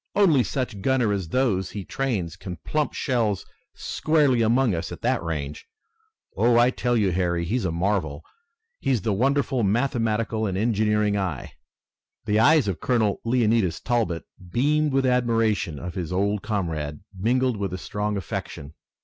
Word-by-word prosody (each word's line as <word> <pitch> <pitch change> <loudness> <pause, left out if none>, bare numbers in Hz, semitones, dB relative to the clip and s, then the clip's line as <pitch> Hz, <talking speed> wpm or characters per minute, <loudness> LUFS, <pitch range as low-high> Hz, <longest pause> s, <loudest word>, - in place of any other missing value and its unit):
Only 175 -10 +5
such 125 -7 -3
gunners 125 -4 +2
as 95 -4 -4
those 100 -6 +1
he 100 -3 -6
trains 110 -12 -2
can 90 -2 -7
plump 150 -1 -1
shells 115 -8 0 0.3
squarely 150 -6 +1
among 115 0 +3
us 80 - -3
at - - -8
that - - +1
range! 75 -3 -5 0.7
Oh, 120 +1 +3
I 120 +1 +5
tell 120 -1 0
you, 100 -4 +2
Harry, 85 -1 0
he's 110 +5 -1
a 85 - 0
marvel. 85 -4 -1 0.6
Has 125 -6 +1
the 110 - +1
wonderful 135 +3 +1
mathematical 110 -1 0
and 95 -1 -2
engineering 105 -1 +1
eye!" 90 -8 -3 0.7
The 105 -1 +2
eyes 150 +1 +5
of 95 - -2
Colonel 110 -5 +1
Leonidas 115 -6 +1
Talbot 115 -9 -1 0.3
beamed 150 - +2
with 135 0 +2
admiration 115 - +1
of 85 +4 -6
his 90 -4 -4
old 100 +2 0
comrade, 80 -8 -3
mingled 125 +4 +1
with 100 -2 -3
a 90 - -3
strong 105 +2 -3
affection. 75 -5 -6
110 Hz, 155 wpm, -24 LUFS, 95-125 Hz, 0.7 s, Only